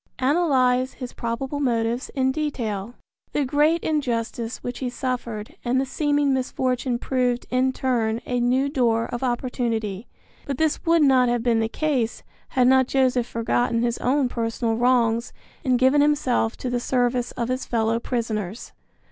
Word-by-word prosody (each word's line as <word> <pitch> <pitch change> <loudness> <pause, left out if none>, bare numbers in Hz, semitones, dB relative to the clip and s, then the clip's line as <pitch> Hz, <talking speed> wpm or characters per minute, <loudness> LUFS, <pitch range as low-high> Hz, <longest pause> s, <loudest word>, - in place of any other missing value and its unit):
Analyze 260 -3 +2
his 250 -2 -8
probable 260 +5 -3
motives 235 -2 0
in 265 -1 +2
detail. 240 -7 -3 0.4
The 290 - +1
great 300 +5 +2
injustice 235 -5 -2
which 245 -1 -5
he 255 - -2
suffered 240 -3 -4
and 255 +2 +1
the 270 - 0
seeming 290 0 +1
misfortune 255 -1 -1
proved 250 -1 0
in 255 +1 +2
turn 235 -4 0
a 245 0 -1
new 255 +3 +2
door 235 -5 +1
of 240 - -4
opportunity, 240 -5 -2 0.4
but 275 -2 -2
this 315 0 0
would 330 -1 +5
not 260 -3 +4
have 240 -1 0
been 235 -2 +2
the 225 0 0
case 265 -5 -1 0.2
had 250 -1 +2
not 260 0 +5
Joseph 255 -3 +2
forgotten 230 0 0
his 240 0 -1
own 265 +1 +2
personal 230 -1 -1
wrongs 235 -1 +2 0.3
and 255 -3 +2
given 260 +3 +4
himself 285 -6 +1
to 250 - -4
the 245 - 0
service 245 0 0
of 235 -1 -3
his 255 +1 -2
fellow 225 -1 +1
prisoners. 225 -4 -3
250 Hz, 155 wpm, -23 LUFS, 235-265 Hz, 0.4 s, would